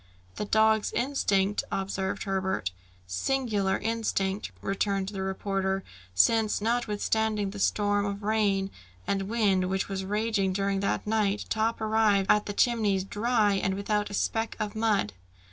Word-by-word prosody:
"The - - -2
dog's 220 0 +3
instinct 205 -7 +1
" - - -27
observed 190 0 -2
Herbert. 190 - -1 0.3
"Singular 200 - 0
instinct!" 210 -3 -1
returned 195 0 -1
the 195 -2 -5
reporter; 190 0 -1 0.3
"since 215 - +3
notwithstanding 220 -2 0
the 205 - -8
storm 205 0 +1
of 200 +1 -5
rain 200 -2 +1 0.3
and 195 0 -1
wind 195 -5 +2
which 190 +1 -1
was 190 -1 -3
raging 205 -1 0
during 195 0 0
that 200 - -1
night, 210 -1 0
Top 225 +1 0
arrived 215 -3 +3
at 210 - +2
the 205 - -3
Chimneys, 210 -4 +2
dry 210 +1 +1
and 195 -1 0
without 210 +1 -1
a 200 - -4
speck 225 +2 -1
of 210 -1 -2
mud!" 215 - +1
205 Hz, 145 wpm, -28 LUFS, 195-220 Hz, 0.3 s, dog's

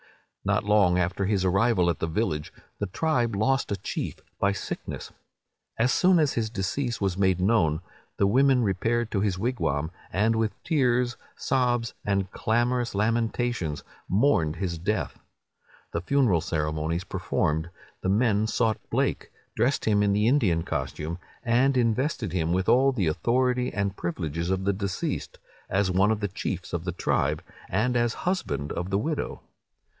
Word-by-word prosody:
"Not - - +1
long 100 -4 +4
after 90 +2 0
his 100 -2 +1
arrival 95 0 +3
at 85 - -6
the 80 - -1
village, 80 -3 -1 0.3
the 105 - -1
tribe 120 - 0
lost 130 +4 +1
a - - +2
chief 95 - -4 0.2
by 100 - +3
sickness. 100 - -5 0.7
As 120 +3 +3
soon 185 +5 +4
as 150 -4 +2
his 110 -2 -1
decease 115 +4 -2
was 95 -2 -1
made 95 -2 +3
known, 90 -6 +2 0.4
the 100 - +3
women 130 +4 +4
repaired 115 +4 0
to 100 - 0
his 100 -3 0
wigwam, 85 - -1 0.2
and 110 +4 +2
with 110 -1 0
tears, 125 -6 +1 0.2
sobs, 120 -4 0
and 100 -1 0
clamorous 120 +1 0
lamentations, 115 -5 0 0.3
mourned 95 - +2
his 85 -2 -3
death. 105 +6 -2 0.7
The 85 - -1
funeral 110 - +2
ceremonies 80 +1 -1
performed, 80 -3 -1 0.3
the 95 - -1
men 110 0 +2
sought 110 -1 +1
Blake, - - 0 0.3
dressed 130 +4 +1
him 105 -2 +3
in 100 -1 +3
the 105 +2 +2
Indian 105 - +3
costume, 75 +3 -3 0.2
and 130 +3 +3
invested 120 - 0
him 85 -2 0
with 95 +1 0
all 135 +2 +5
the 110 -9 0
authority 125 +9 +1
and 100 -1 -1
privileges 85 -1 -3
of 95 0 0
the 100 +1 +2
deceased, 100 -1 -3 0.3
as 95 0 +1
one 95 +3 +3
of 110 -1 0
the 105 - 0
chiefs 95 -1 -4
of 85 -1 -2
the 90 - -1
tribe, 90 - 0 0.3
and 115 +6 +1
as 120 -1 +1
husband 180 - -1
of 90 +1 -3
the 95 - +1
widow. 145 +7 -2
105 Hz, 160 wpm, -26 LUFS, 90-120 Hz, 0.7 s, all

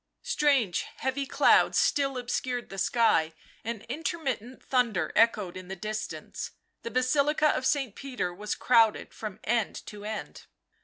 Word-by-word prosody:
Strange, 280 - +2
heavy 265 +1 -2
clouds - - +4
still 275 -2 +2
obscured 245 0 -2
the 195 - -5
sky, 175 -7 +2 0.3
and 225 -1 -4
intermittent 260 -3 -4
thunder 230 -11 +1
echoed 215 -5 +3
in 185 -1 -8
the 190 - -5
distance. 215 +3 -5 0.3
The - - -5
Basilica 285 +5 +2
of 260 - +1
St. 270 -7 0
Peter 250 -10 -3
was 210 +3 -3
crowded 230 -3 +3
from 215 -4 -7
end 230 -2 -1
to 205 -1 -9
end. 215 +1 -6
235 Hz, 140 wpm, -28 LUFS, 210-265 Hz, 0.3 s, clouds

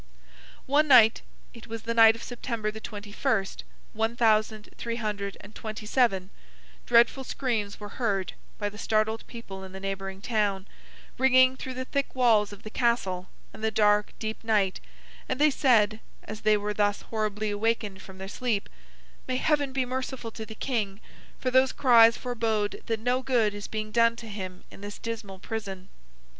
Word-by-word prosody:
One 295 +3 +3
night—it 230 -2 +3
was 225 -1 -6
the 230 - -2
night 225 -1 +7
of 230 - -9
September 230 -3 -3
the 220 - -8
twenty 205 -1 -8
first, 195 -1 -1 0.3
one 225 +2 -1
thousand 215 -2 +2
three 235 -1 -4
hundred 205 -3 -3
and 205 - -13
twenty 215 -1 -7
seven—dreadful 195 - +1
screams 225 -7 -2
were 205 -1 -7
heard, 195 -7 0 0.2
by 205 - -2
the 210 +1 -8
startled 220 0 0
people 195 -5 -9
in 190 0 -10
the 190 - -7
neighbouring 195 0 -4
town, 205 -3 -1 0.5
ringing 255 0 +5
through 260 0 -6
the 255 0 -4
thick 280 +1 -2
walls 225 -5 +4
of 205 - -12
the 215 - -8
Castle, 195 -8 0 0.2
and 220 - -11
the 220 - +3
dark, 210 -1 +3
deep 220 0 -5
night; 210 -4 +1 0.5
and - - -1
they 300 0 +5
said, 225 -6 +3 0.2
as 215 0 -8
they 215 -1 +4
were 210 0 -3
thus 205 0 0
horribly 215 -1 -2
awakened 210 -2 -1
from 190 -1 -12
their 190 0 -7
sleep, 220 -1 -2 0.6
'May 255 - -1
Heaven 290 -1 +1
be 260 -1 0
merciful 255 -2 -4
to 220 0 -8
the 220 - -9
King; 215 -6 -2 0.4
for 255 - -2
those 260 +1 +4
cries 230 -3 +6
forbode 225 -4 -1
that 225 -1 -1
no 245 +3 +1
good 240 -5 +2
is 205 0 -6
being 215 -1 -4
done 230 0 +4
to 230 0 -9
him 185 -3 -7
in - - -13
his 205 0 -7
dismal 220 -4 -6
prison! 195 -3 -6
220 Hz, 175 wpm, -27 LUFS, 205-235 Hz, 0.6 s, night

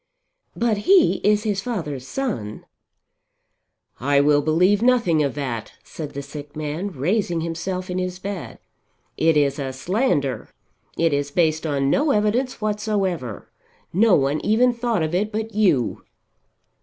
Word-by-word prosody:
"But 230 -2 +1
he 385 -4 +6
is 210 0 +3
his 205 -3 -1
father's 150 - -4
son." 205 - -4 1.3
"I 140 +2 +2
will 145 0 +4
believe 180 +7 +3
nothing 235 -10 +3
of 140 -2 -1
that," 125 -6 -4
said 155 -3 -8
the 140 - -4
sick 145 +1 -9
man 155 +6 -3
raising 175 - -1
himself 180 +3 -3
in 180 -1 -2
his 180 0 -3
bed. 195 -1 -6 0.6
"It 160 -1 +3
is 145 -1 +2
a 135 -1 -3
slander; 145 - -1 0.5
it 165 -2 +2
is 145 0 0
based 160 0 +1
on 140 -2 +1
no 295 +2 +2
evidence 235 +3 +1
whatsoever. 205 - -2 0.4
No 205 +2 +5
one 140 +2 0
even 245 +4 +3
thought 235 -6 -1
of 155 +1 -2
it 205 +4 0
but 220 +1 -4
you." 180 - +2
175 Hz, 145 wpm, -22 LUFS, 145-210 Hz, 1.3 s, he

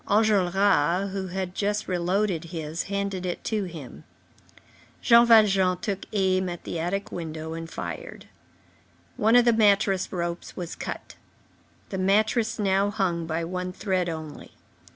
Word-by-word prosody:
Enjolras, 195 -3 +3
who 190 -1 -3
had 185 0 -4
just 205 +1 -1
re 180 -2 -1
loaded 180 -1 0
his, 160 -1 -5
handed 200 -2 -2
it 180 -1 -4
to 215 -3 -1
him. 160 -7 -9 1.0
Jean 235 0 +6
Valjean 195 -5 +5
took 200 -1 -4
aim 185 -2 +1
at 175 -1 -7
the 170 - -4
attic 195 +4 -2
window 160 -1 -5
and 165 0 -6
fired. - - -7 0.9
One 220 +3 +3
of 245 -1 +6
the 235 - +5
mattress 200 -3 +3
ropes 170 -1 -4
was 175 -3 -5
cut. - - -7 0.7
The 190 - -4
mattress 215 +4 +2
now 200 -1 +2
hung 180 -5 -1
by 165 +1 -2
one 180 +1 -4
thread 185 -3 -1
only. 160 -2 -8
190 Hz, 145 wpm, -26 LUFS, 175-205 Hz, 1.0 s, Jean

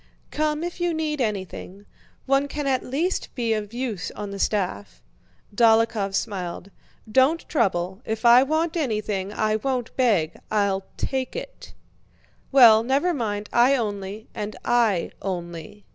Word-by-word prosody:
"Come 305 +1 -1
if 350 +1 -5
you 350 -1 +1
need 305 -3 -2
anything. 200 -2 -4 0.4
One 275 +1 +2
can 295 +1 -4
at 265 -2 +1
least 320 +9 -2
be 235 -3 0
of 210 -1 -3
use 235 -7 -3
on 205 -1 -6
the 200 - -6
staff..." 100 - -2 0.6
Dólokhov 225 -3 +3
smiled. 190 -3 -4 0.4
"Don't 265 +7 +3
trouble. 190 - 0
If 220 +1 -4
I 240 +1 +8
want 315 +5 0
anything, 210 - -2
I 215 0 0
won't 255 0 -3
beg—I'll 200 -2 0
take 265 -1 -3
it!" - - -8 0.8
"Well, 235 -5 +8
never 275 +9 +1
mind; 210 -6 -3
I 250 +3 +5
only..." 205 -2 -4
"And 210 0 -5
I 230 -7 +2
only..." 175 +1 -6
225 Hz, 135 wpm, -24 LUFS, 200-270 Hz, 0.8 s, I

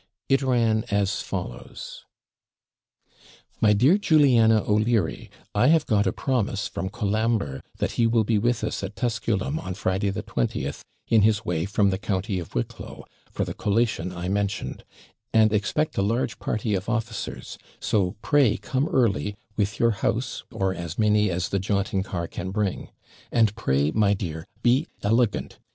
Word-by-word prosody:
It 135 +1 +4
ran 115 -4 +2
as 100 -1 +1
follows: - - -7 1.6
MY 105 -1 +5
DEAR 130 - +5
JULIANA 125 - +5
O'LEARY, 105 -4 +1 0.2
I 120 +5 +3
have 160 0 +4
got 105 -1 +2
a - - +2
promise 110 -6 -1
from 95 - -4
Colambre, 105 - -1 0.2
that - - -1
he 115 - +2
will 115 -1 +3
be 110 0 +1
with 120 +2 0
us - - -2
at 100 +1 -5
Tusculum 115 +5 -1
on 95 - -5
Friday 100 0 0
the 95 - -3
20th, - - -2 0.3
in 115 -2 +4
his 105 0 +2
way 85 -1 -1
from 100 0 +2
the 95 - -2
county 100 -2 -1
of 85 - -9
Wicklow, - - -5 0.3
for - - -2
the - - -5
collation 105 -4 0
I 90 0 -5
mentioned; 100 +1 -2 0.5
and 110 -1 +5
expect 105 +9 0
a - - +3
large 110 +1 -1
party 110 0 -1
of 95 +2 -2
officers; 115 -2 -4 0.2
so 100 -2 0
pray 145 -7 +3
come 135 +4 -1
early, 105 - +1 0.2
with 105 +1 -1
your 115 -1 +4
house, 100 - -2
or 95 -1 0
as 85 -2 -6
many 105 -1 +3
as 90 +1 -1
the 100 - 0
jaunting 100 0 0
car 95 -3 -3
can 90 +2 -5
bring. 100 -1 -2 0.4
And 110 -3 +3
pray, 70 - +1
my 100 0 +3
dear, 80 -4 -5 0.2
be 130 +7 +3 0.2
ELEGANT. 115 +2 +1
105 Hz, 160 wpm, -25 LUFS, 95-115 Hz, 1.6 s, MY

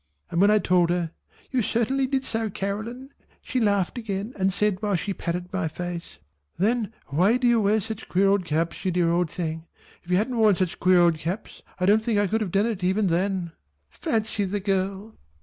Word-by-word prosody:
and 170 - +1
when 200 - +6
I 215 - +5
told 180 -4 +3
her 175 -2 0 0.4
"You 255 - +2
certainly 235 +5 0
did 265 0 0
so 225 -3 -2
Caroline" 215 +7 -4 0.3
she 255 - -2
laughed 205 0 +1
again 210 +1 -4
and 190 0 +1
said 205 0 0
while 205 -2 +1
she 195 +3 -2
patted 180 +1 -4
my 190 -3 0
face 170 - -6 0.4
"Then 220 +2 +1 0.2
why 185 - +3
do 250 - -2
you 235 -2 +4
wear 210 +2 +3
such 220 +1 -6
queer 195 +2 +3
old 195 -1 +3
caps 165 +2 -2
you 190 - +1
dear 175 -1 +2
old 175 -1 +1
thing? 160 0 -4 0.3
if 175 - -18
you 180 - +3
hadn't 235 +5 0
worn 215 -3 +5
such 180 -1 -2
queer 180 -1 +5
old 170 -2 +3
caps 175 +8 -5 0.2
I 180 - +1
don't 210 +3 +4
think 220 -2 +1
I 205 - +3
should 220 +4 0
have 210 - -1
done 200 +3 +2
it 215 -5 -3
even 190 +2 +2
then." 180 0 0 0.4
Fancy 220 -2 -1
the 200 +2 -2
girl! 195 +2 -2
195 Hz, 210 wpm, -25 LUFS, 180-220 Hz, 0.4 s, when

